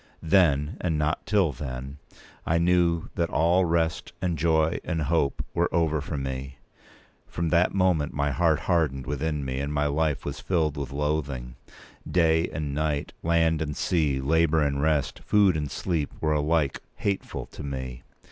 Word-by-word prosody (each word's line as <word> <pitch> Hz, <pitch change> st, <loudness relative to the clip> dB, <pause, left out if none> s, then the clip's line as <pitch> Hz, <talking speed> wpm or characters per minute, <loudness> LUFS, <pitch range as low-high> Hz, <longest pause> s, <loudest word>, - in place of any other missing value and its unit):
Then, 80 Hz, -3 st, +3 dB
and 80 Hz, -4 st, 0 dB
not 75 Hz, +1 st, -1 dB
till 100 Hz, -7 st, +3 dB
then, 65 Hz, 0 st, -6 dB, 0.4 s
I 80 Hz, -, +1 dB
knew 85 Hz, -1 st, +2 dB
that 85 Hz, -1 st, -1 dB
all 85 Hz, +3 st, +3 dB
rest, 80 Hz, -1 st, 0 dB
and 90 Hz, -2 st, -1 dB
joy, 80 Hz, +1 st, +2 dB
and 80 Hz, -3 st, -2 dB
hope 70 Hz, -2 st, 0 dB
were 85 Hz, 0 st, +1 dB
over 80 Hz, -3 st, +1 dB
for 75 Hz, +1 st, -4 dB
me. 65 Hz, 0 st, -5 dB, 0.7 s
From 85 Hz, -1 st, -2 dB
that 85 Hz, +3 st, +2 dB
moment 90 Hz, -6 st, +2 dB
my 70 Hz, 0 st, 0 dB
heart 80 Hz, +1 st, +2 dB
hardened 75 Hz, -7 st, 0 dB
within 75 Hz, +1 st, -2 dB
me, 65 Hz, 0 st, -3 dB
and 70 Hz, +1 st, -2 dB
my 75 Hz, 0 st, 0 dB
life 75 Hz, 0 st, 0 dB
was -, -, -4 dB
filled 80 Hz, -5 st, 0 dB
with 70 Hz, -3 st, -5 dB
loathing. 70 Hz, -4 st, -2 dB, 0.6 s
Day 80 Hz, -1 st, +3 dB
and 75 Hz, -3 st, -4 dB
night, 75 Hz, -1 st, -1 dB
land 80 Hz, -1 st, +2 dB
and 75 Hz, -2 st, -3 dB
sea, 75 Hz, -6 st, +1 dB
labour 80 Hz, +2 st, +2 dB
and 70 Hz, -1 st, 0 dB
rest, 75 Hz, -3 st, +1 dB
food 100 Hz, -4 st, +4 dB
and 75 Hz, -2 st, -2 dB
sleep, 80 Hz, -5 st, -2 dB
were 75 Hz, -1 st, +1 dB
alike 75 Hz, -1 st, +1 dB
hateful 100 Hz, -1 st, -3 dB
to -, -, -11 dB
me. 65 Hz, -3 st, -5 dB
80 Hz, 165 wpm, -26 LUFS, 70-85 Hz, 0.7 s, food